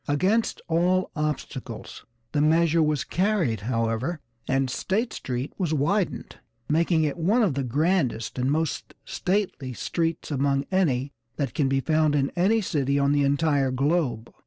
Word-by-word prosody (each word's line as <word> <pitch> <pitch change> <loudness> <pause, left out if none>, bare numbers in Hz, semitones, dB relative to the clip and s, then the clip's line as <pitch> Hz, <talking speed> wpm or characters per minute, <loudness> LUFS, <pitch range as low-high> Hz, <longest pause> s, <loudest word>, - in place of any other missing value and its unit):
Against 190 +11 +1
all 180 +2 +1
obstacles 150 -2 -5 0.2
the 145 - +1
measure 165 +1 +3
was 150 -3 +1
carried, 185 - 0
however, 115 +7 -1 0.3
and 135 0 +1
State 210 - -1
Street 125 +2 -4
was 165 -4 0
widened, 180 +7 -1 0.3
making 165 +1 +2
it 150 0 -1
one 205 +9 +2
of 185 -9 +2
the 135 - -1
grandest 135 - 0
and 130 +2 +1
most 160 +1 -2
'stately' 180 -9 -2
streets 165 +6 -2
among 140 0 +1
any 140 -8 +1 0.2
that 135 -6 -2
can 140 -3 +1
be 135 0 +1
found 155 0 +2
in 140 -1 +1
any 205 +6 +3
city 140 -7 0
on 140 0 +2
the 145 0 +3
entire 140 -1 +2
globe. 130 -3 0
150 Hz, 150 wpm, -25 LUFS, 135-175 Hz, 0.3 s, measure